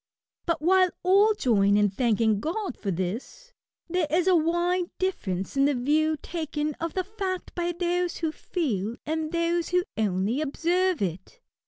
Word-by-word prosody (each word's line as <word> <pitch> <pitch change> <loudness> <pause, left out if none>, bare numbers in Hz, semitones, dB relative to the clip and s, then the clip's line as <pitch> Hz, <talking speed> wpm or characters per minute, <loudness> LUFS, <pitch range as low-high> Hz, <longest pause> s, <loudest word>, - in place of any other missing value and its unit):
But, 335 -2 0
while 370 +2 +5
all 400 +4 +5
join 205 - +3
in 205 -1 +3
thanking 220 -1 +2
God 350 - -3
for 200 - -5
this, 220 - -4 0.3
there 350 -2 0
is 345 +4 +1
a 370 - +5
wide 345 +2 +1
difference 195 - -2
in 275 0 +4
the 285 -1 +2
view 305 +5 +1
taken 305 -2 -3
of 330 -1 -3
the 370 - 0
fact 380 -2 -4
by 345 0 -1
those 350 0 -1
who 320 -2 -1
feel 235 - -2
and 315 0 -2
those 335 0 0
who 360 0 +2
only 210 +5 0
observe 345 - +1
it. 185 - -5
320 Hz, 160 wpm, -26 LUFS, 235-360 Hz, 0.3 s, while